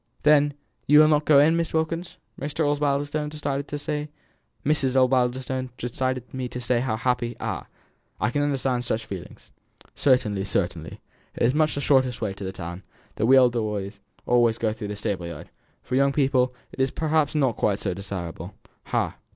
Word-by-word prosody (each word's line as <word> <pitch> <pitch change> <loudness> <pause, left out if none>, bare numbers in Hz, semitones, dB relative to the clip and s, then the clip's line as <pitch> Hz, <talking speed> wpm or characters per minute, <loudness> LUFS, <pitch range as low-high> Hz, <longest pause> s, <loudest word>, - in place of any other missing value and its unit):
Then 145 -1 +4 0.3
you 150 - +7
will 155 0 +8
not 150 -1 +2
go 150 - +6
in, 150 +4 +6
Miss 165 -1 -1
Wilkins?" 165 +2 -2 0.2
Mrs. 145 +2 -1
Osbaldistone 145 +1 0
desired 145 -2 -3 2.7
me 130 -1 -3
to 125 - -6
say 120 0 +1
how 120 -3 -1
happy 120 -1 -1
"Ah! - - -4 0.5
I 105 - +1
can 145 - 0
understand 135 -3 0
such 110 -2 -2
feelings 95 -3 -9 0.4
Certainly, 110 -8 +2
certainly; 85 -4 -2 0.3
it - - -1
is 120 - +4
so 145 - -2
much 155 -1 +2
the 140 - -2
shortest 130 -3 +2
way 105 -4 -2
to 100 - -9
the 95 - -3
town, 85 -1 -7 0.4
that 110 - +1
we 135 +2 +7
elder 120 -2 +4
ones 105 -1 -4 0.3
always 120 -2 +3
go 110 -2 0
through 110 -1 -6
the 105 - -4
stable 100 -5 -3
yard; 85 -3 -9 0.3
for - - -7
young 140 +1 +3
people, 130 -3 +2 0.2
it - - -12
is 130 0 +3
perhaps 155 +1 0
not 135 -6 +2
quite 100 -2 +1
so 95 -3 -2
desirable. 90 -2 -6 0.3
Ha! - - -1
125 Hz, 170 wpm, -25 LUFS, 105-145 Hz, 2.7 s, will